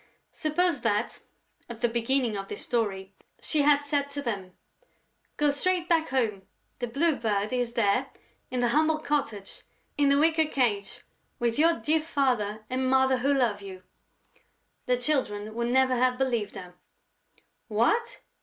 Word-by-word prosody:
Suppose 335 +1 0
that, 215 0 -1 0.5
at 235 -1 -8
the 240 - +3
beginning 235 0 0
of 195 -1 -5
this 205 - -6
story, 200 -5 -2 0.3
she 310 - +1
had 290 0 +4
said 285 -1 -1
to 285 0 -5
them: 195 -7 -5 0.8
"Go 295 -1 +3
straight 350 +4 0
back 330 -2 +2
home. 230 -7 0 0.4
The 245 - -2
Blue 290 +6 +1
Bird 215 -2 -1
is 245 -2 -1
there, 205 -4 +1 0.4
in 250 -1 -2
the 240 - +2
humble 310 +4 +2
cottage, 275 -10 -3 0.4
in 285 -1 +4
the 280 - +4
wicker 320 +1 +3
cage, 225 -9 -1 0.4
with 240 +1 -1
your 330 +2 +5
dear 315 0 +1
father 245 -9 -1
and 255 +1 -1
mother 265 0 +3
who 270 +3 +1
love 240 -7 +1
you." 190 -2 -10 1.0
The 250 0 +2
Children 220 -6 -1
would 235 +1 -2
never 260 +1 +3
have 250 0 +2
believed 240 -6 -1
her: 180 -1 -9 0.9
"What!" 240 - 0
250 Hz, 155 wpm, -27 LUFS, 215-290 Hz, 1.0 s, your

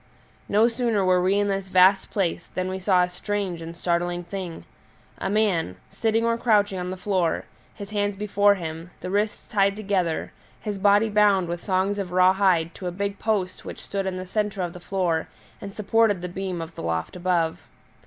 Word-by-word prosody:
No 215 +3 +5
sooner 230 -4 0
were 185 -1 +4
we 185 +2 +2
in 205 0 +2
this 195 -1 -2
vast 185 +1 +5
place 175 -3 -1
than 185 0 -1
we 190 0 -3
saw 185 -1 +3
a 180 - -1
strange 190 -2 -3
and 165 +1 -8
startling 175 0 -1
thing 175 -1 -6 0.5
a 190 - -2
man, 195 - +1 0.2
sitting 225 0 +1
or 230 0 +1
crouching 205 -5 +2
on 180 0 -3
the 185 - -5
floor, 185 -3 0 0.3
his 200 0 -8
hands 205 -1 0
before 205 0 +3
him, 165 -1 -6
the 185 - -5
wrists 205 +2 -1
tied 200 -1 +2
together, 195 -6 -1 0.3
his 205 -2 -4
body 205 +2 +4
bound 205 -4 +3
with 170 0 -4
thongs 195 +1 0
of 185 -3 -4
raw 185 +1 +5
hide 185 -4 +2
to 185 - -6
a - - -2
big 200 +2 -3
post 205 -4 -1
which - - -8
stood 195 -1 -3
in 185 -1 -2
the 185 - -5
centre 205 0 -1
of 175 -1 -4
the 180 - -9
floor 175 -3 -1 0.3
and 200 -1 -8
supported 210 -3 +2
the - - -2
beam 180 -2 -4
of 165 +1 -10
the - - -8
loft 80 0 -2
above. 175 -2 -1
190 Hz, 200 wpm, -24 LUFS, 180-205 Hz, 0.5 s, No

